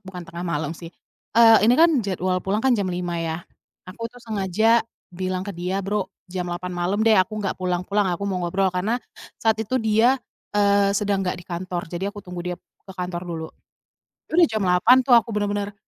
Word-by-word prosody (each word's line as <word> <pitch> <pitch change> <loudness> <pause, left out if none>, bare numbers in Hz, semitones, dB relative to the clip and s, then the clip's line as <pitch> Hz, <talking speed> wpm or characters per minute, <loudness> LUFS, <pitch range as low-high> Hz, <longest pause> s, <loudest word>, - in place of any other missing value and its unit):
bukan 185 -2 -9
tengah 170 - -9
malam 160 -2 -2
sih, 170 - -9 0.5
eee, 225 -1 +8
ini 240 +3 +5
kan 330 +1 +6
jadwal 185 -3 -1
pulang 200 +4 -1
kan 265 - +4
jam 200 -3 -1
5.00 175 -1 -3
ya. 165 -1 -2 0.5
Aku 230 +5 -6
tuh 245 - -20
sengaja 220 +2 +2 0.3
bilang 185 +1 -3
ke 200 - -5
dia, 180 +2 -3
"Bro 200 -1 -1 0.2
jam 180 -1 -4
8.00 180 +1 -4
malam 175 +3 -1
deh 225 - +6
aku 190 +2 +2
nggak 200 -2 -2
pulang-pulang 185 +3 0
aku 200 +4 -3
mau 185 -2 -2
ngobrol," 190 +2 +1
karena 195 +6 0 0.4
saat 220 -1 +1
itu 225 +4 -1
dia, 220 +4 +3 0.4
eee, 200 -1 +4
sedang 200 -1 0
nggak 180 - -1
di - - -14
kantor, 175 0 -4
jadi 190 +3 -2
aku 205 - -9
tunggu 180 -1 -7
dia 180 -1 -3
ke 190 - -17
kantor 180 -1 -4
dulu. 160 -2 -4 0.8
Ya - - -19
udah 345 - +7
jam 215 -2 -2
8.00 180 +7 +5
tuh 260 - +4
aku 230 - 0
bener-bener, 205 0 -2
190 Hz, 200 wpm, -23 LUFS, 180-210 Hz, 0.8 s, eee